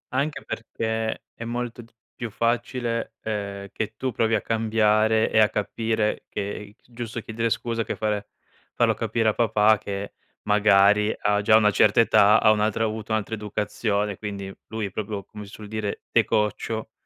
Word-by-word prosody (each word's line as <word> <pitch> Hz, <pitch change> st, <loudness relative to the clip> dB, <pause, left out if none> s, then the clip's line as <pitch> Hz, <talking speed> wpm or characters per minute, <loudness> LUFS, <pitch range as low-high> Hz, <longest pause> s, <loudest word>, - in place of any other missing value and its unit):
Anche 145 Hz, +2 st, -1 dB
perché 110 Hz, -1 st, -3 dB
è 115 Hz, -, -8 dB
molto 120 Hz, 0 st, -4 dB
d 115 Hz, -, -18 dB, 0.2 s
più 120 Hz, -2 st, -5 dB
facile, 115 Hz, +1 st, -1 dB
ehm, 100 Hz, -2 st, -4 dB
che 110 Hz, 0 st, -4 dB
tu 130 Hz, -1 st, -2 dB
provi 110 Hz, 0 st, +1 dB
a 105 Hz, -, 0 dB
cambiare 110 Hz, 0 st, +2 dB
e 110 Hz, -, +4 dB
a 105 Hz, -, +6 dB
capire 110 Hz, +1 st, -1 dB
che -, -, -5 dB
i 100 Hz, +1 st, -6 dB
s 120 Hz, -, -29 dB
giusto 120 Hz, 0 st, -5 dB
chiedere 115 Hz, +1 st, -2 dB
scusa 115 Hz, +1 st, -1 dB
che -, -, -4 dB
fare 105 Hz, -1 st, -2 dB, 0.5 s
farlo -, -, +3 dB
capire 115 Hz, -2 st, 0 dB
a -, -, +1 dB
papà 110 Hz, -2 st, +3 dB
che, 100 Hz, 0 st, -5 dB, 0.3 s
magari, 105 Hz, 0 st, +4 dB
ha 105 Hz, 0 st, +2 dB
già 110 Hz, +1 st, +5 dB
una 105 Hz, -1 st, +4 dB
certa 105 Hz, +2 st, +4 dB
età, 105 Hz, -2 st, +6 dB
ha 110 Hz, -, +5 dB
un'altra 110 Hz, +1 st, +1 dB
ha -, -, +2 dB
avuto 110 Hz, 0 st, -5 dB
un'altra 110 Hz, 0 st, -1 dB
educazione. 105 Hz, -1 st, -2 dB
Quindi, 100 Hz, -2 st, -6 dB
lui 110 Hz, -1 st, -3 dB
è 95 Hz, -, -5 dB
proprio 105 Hz, -1 st, -4 dB
come 105 Hz, -1 st, -10 dB
si 100 Hz, -, -14 dB
suol 105 Hz, -1 st, -10 dB
dire, 110 Hz, -1 st, -4 dB
di -, -, +4 dB
coccio 110 Hz, +1 st, -1 dB
110 Hz, 180 wpm, -24 LUFS, 105-115 Hz, 0.5 s, a